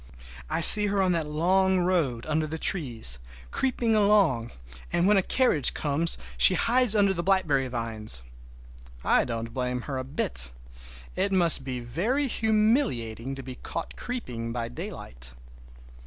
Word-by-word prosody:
I - - -1
see 210 +5 +9
her 200 0 -1
on 185 -1 +2
that 165 -3 -1
long 185 +5 +1
road 165 -10 -1
under 155 0 -1
the 160 +1 -5
trees, 120 - -1 0.3
creeping 240 -4 0
along, 200 - +2 0.4
and 175 - +1
when 210 - +4
a - - +4
carriage 185 - +2
comes 155 +3 -1 0.2
she 60 - +7
hides 245 -2 +4
under 200 -2 +3
the 170 - -3
blackberry 170 -8 +1
vines. 110 - -4 0.8
I - - +2
don't 115 -1 -5
blame 125 -1 -3
her 135 +1 -5
a - - -4
bit. 65 - -1 0.7
It 200 - -1
must 170 -7 +2
be 130 -1 -5
very 210 - -1
humiliating 215 - 0
to 135 - -9
be 130 0 -8
caught 165 +5 -7
creeping 125 - -6
by 115 -1 -4
daylight! - - -8
155 Hz, 150 wpm, -26 LUFS, 120-195 Hz, 0.8 s, see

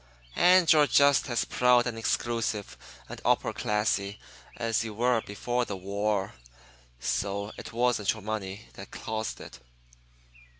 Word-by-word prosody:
And 180 -2 +6
you're 150 -2 +5
just 140 -1 +4
as 120 - 0
proud 125 -1 +3
and 120 -2 -3
exclusive 115 -2 -2 0.3
and - - -9
upper - - +1
classy 105 -1 -1 0.4
as 115 -1 0
you 110 -2 -6
were 120 0 +2
before 120 +5 -2
the 100 -4 -5
war. 100 +1 -2 0.7
So 100 - -2
it - - -9
wasn't 120 -3 +1
your 110 -2 -11
money 105 -2 -5
that - - -10
caused 110 0 -5
it." - - -11
110 Hz, 135 wpm, -28 LUFS, 100-120 Hz, 0.7 s, And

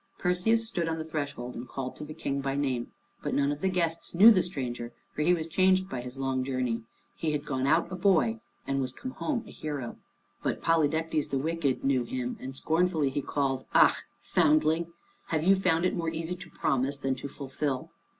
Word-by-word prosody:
Perseus 220 +6 +2
stood 175 -7 -1
upon 160 0 -1
the 160 - -4
threshold 140 -6 -4
and 120 - -7
called 130 -2 -5
to - - -8
the 155 +1 -8
King 140 0 -2
by 135 0 -1
name. 130 -4 -1 0.3
But 145 - -2
none 140 0 +2
of 145 +1 -4
the 190 - +2
guests 170 -2 -1
knew 210 +6 +10
the 190 -5 +5
stranger, 125 -8 -4 0.2
for - - -3
he 165 +4 +4
was 165 -3 +1
changed 185 +3 +3
by 130 -8 -4
his 125 +2 -8
long 135 -1 0
journey. 130 -3 -1 0.3
He 155 -2 -1
had 145 0 -2
gone 135 -2 -1
out 160 +5 +3
a - - -3
boy, 165 - +3 0.3
and 135 0 -1
he - - +1
was 130 -1 -2
come 255 - -7
home 260 -3 -2
a - - -10
hero. 145 -6 -5 0.4
But - - -1
Polydectes 160 -1 +1
the 135 - 0
Wicked, 150 -2 0
knew 135 -2 +2
him, 125 +1 -3
and 130 0 -7
scornfully 160 -1 +1
he 145 - -1
called, 135 -2 -1
"Ah, - - +7 0.3
foundling! 155 +2 +3 0.4
have 155 -1 0
you 190 +3 +6
found 180 -3 +2
it 185 - +2
more 165 -2 -1
easy 165 +1 -3
to 180 -1 -11
promise 140 -1 0
than 135 -1 0
to 135 - -5
fulfil?" 135 -1 -3
150 Hz, 210 wpm, -29 LUFS, 135-170 Hz, 0.4 s, knew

